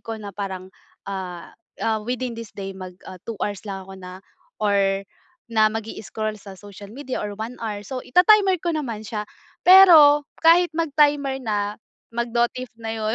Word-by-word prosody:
ko 225 0 -6
na 205 -2 -8
parang, 190 -1 -6 0.3
ah 185 -3 -6 0.2
ah, 220 -1 -1
within 245 +2 -3
this 230 -2 -10
day 195 -1 -5
mag, 185 -1 -10
ah, 185 - -10
2 225 - -4
hours 205 -2 -4
lang 195 -1 -5
ako 190 0 -12
na, 185 +1 -11 0.3
or 195 -1 +1 0.5
na 215 -1 +4
mag-i-scroll 215 -1 -5
sa 195 -2 -11
social 200 0 -12
media 260 +4 -5
or 205 -1 -5
1 225 +3 -7
hour, 210 -2 -5
so 255 +4 -5
ita-timer 380 - +4
ko 340 +1 -2
naman 235 -8 -4
siya. 210 -1 -4 0.4
Pero, 320 -6 +8 0.2
kahit 335 +1 +5
mag-timer 290 -4 +2
na, 210 -4 -2 0.4
mag-notif 235 +1 -1
na 225 0 -4
yun 220 0 -1
220 Hz, 165 wpm, -23 LUFS, 200-265 Hz, 0.5 s, Pero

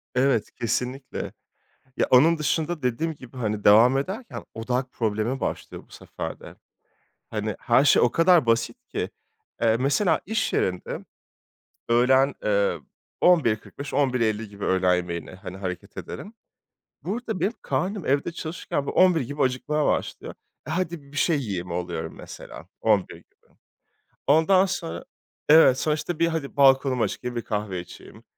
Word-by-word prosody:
Evet 125 -3 +2
kesinlikle. 125 +3 -3 0.6
Ya - - +2
onun 155 +6 +6
dışında 155 +2 -1
dediğim 155 +6 -1
gibi, 130 -2 -14
hani, 105 -4 -2
devam 115 +6 +6
ederken 200 - -5
odak 125 +3 -2
problemi 110 +3 -1
başlıyor - - -4
bu - - -32
sefer - - -7
de. - - -12 0.7
Hani, 110 -1 -3
her 125 +3 +3
şey 140 - +5
o 120 - +4
kadar 165 -2 +4
basit 115 0 +1
ki. - - -3 0.5
Eee, 115 0 +4
mesela 145 - +2
iş 220 +2 -1
yerinde; 90 -1 -2 0.9
öğlen, 130 +4 +4
eee, 100 -1 +1 0.4
11.45-11.50 125 - +1
gibi 100 0 -7
öğlen 90 -1 +3
yemeğine, 85 0 -4
hani, 95 0 -9
hareket 90 -2 -6
ederim. 210 - -7 0.7
Burada 220 0 -4
benim 210 - 0
karnım 195 -1 -2
evde 140 +5 +1
çalışırken 155 -3 -4
böyle - - -4
11.00 180 -4 +5
gibi 145 +4 -4
acıkmaya 145 +4 0
başlıyor. - - -2 0.3
E - - -6
hadi 170 -2 -2
bir 145 - -9
şey 160 0 +2
yiyeyim 95 -8 -4
oluyorum 85 -1 -4
mesela - - -10
11.00 105 -4 +2
gibi. - - -23 0.7
Ondan 185 +6 +5
sonra, 85 - -4 0.4
evet 150 -4 +7
sonuçta 155 +3 -1
bir 170 - +3
hadi 160 -4 -4
balkonumu 135 -3 +4
çıkayım, 125 -1 -6
bir 120 - -2
kahve 105 -5 -3
içeyim, 90 0 -13
130 Hz, 140 wpm, -25 LUFS, 110-155 Hz, 0.9 s, evet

